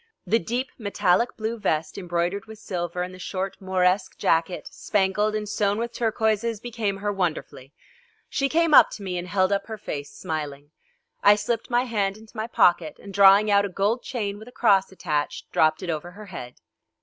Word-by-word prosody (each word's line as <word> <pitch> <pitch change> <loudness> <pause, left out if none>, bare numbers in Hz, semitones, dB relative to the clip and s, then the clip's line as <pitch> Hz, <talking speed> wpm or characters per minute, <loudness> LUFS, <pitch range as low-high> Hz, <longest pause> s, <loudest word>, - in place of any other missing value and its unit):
The 225 - +3
deep 245 +8 -3
metallic 200 +1 +1
blue 225 +1 -3
vest 155 -6 -1
embroidered 175 +2 -2
with 220 0 -10
silver 180 -3 -3
and 180 +1 -6
the 185 - -11
short 190 +1 -4
Mauresque 185 0 +1
jacket 170 -2 0
spangled 210 +1 0
and 210 -1 -3
sewn 205 0 0
with 235 +1 -3
turquoises 220 -1 0
became 220 -4 -3
her 205 +1 -2
wonderfully. 165 -7 -3 0.6
She 275 0 0
came 330 0 +2
up - - +9
to 205 - -8
me 180 -2 -3
and 175 - -6
held 185 0 +1
up 200 0 0
her 220 -1 -6
face 145 -7 -6
smiling. 145 -2 -5 0.5
I 205 +1 +7
slipped 225 +2 -2
my 240 0 +2
hand 205 -5 -1
into 220 +1 -17
my 220 0 -3
pocket, 175 -7 +3
and 200 - -11
drawing 200 +2 +6
out 200 0 +5
a 200 - -2
gold 205 +6 0
chain 205 -5 -4
with 220 - -12
a - - -11
cross 200 -6 +3
attached, 150 -6 -3
dropped 155 +2 +2
it 180 - -4
over 160 +2 -4
her 210 +2 -10
head. 150 -10 -8
200 Hz, 190 wpm, -25 LUFS, 180-220 Hz, 0.6 s, up